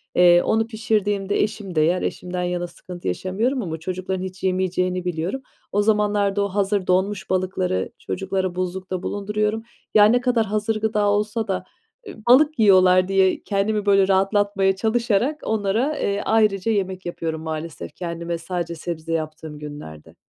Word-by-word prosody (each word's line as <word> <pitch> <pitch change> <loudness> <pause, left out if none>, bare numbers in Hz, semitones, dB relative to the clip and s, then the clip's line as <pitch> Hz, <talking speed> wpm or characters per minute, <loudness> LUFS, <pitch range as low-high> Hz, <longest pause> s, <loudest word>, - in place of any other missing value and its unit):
Eee, 175 -1 +6
onu 220 0 +1
pişirdiğimde 205 -3 0
eşim 205 -3 -5
de 155 - +4
yer, 170 +4 +2
eşimden 180 0 -3
yana 175 0 -2
sıkıntı 175 0 -9
yaşamıyorum 210 - -1
ama 165 -6 -4
çocukların 185 +2 -3
hiç 185 0 -8
yemeyeceğini 185 -1 0
biliyorum. 180 +9 -2 0.3
O 205 - +2
zamanlarda, 205 -1 +2
o - - 0
hazır 195 0 0
donmuş 190 +2 0
balıkları 185 - -1
çocuklara 190 -1 -2
buzlukta 185 0 -3
bulunduruyorum. 210 +2 -1 0.3
Ya, 210 -1 +8
ne 240 +4 +4
kadar 245 -3 +2
hazır 215 +1 -1
gıda 215 -1 +1
olsa 210 +2 0
da, 190 -2 -2 0.4
eee, 390 - -8
balık 295 +4 +5
yiyorlar 185 -3 +5
diye 190 -1 +2
kendimi 205 +1 0
böyle 195 -1 +4
rahatlatmaya 195 0 +2
çalışarak 235 +6 0
onlara, 220 +7 0
eee, 200 0 0
ayrıca 215 -1 +2
yemek 190 -3 -2
yapıyorum 165 -2 -4
maalesef, 160 0 -6
kendime 170 -1 -4
sadece 170 0 -4
sebze 165 0 -5
yaptığım 155 -1 -4
günlerde. 145 - -10
190 Hz, 150 wpm, -22 LUFS, 180-210 Hz, 0.4 s, Ya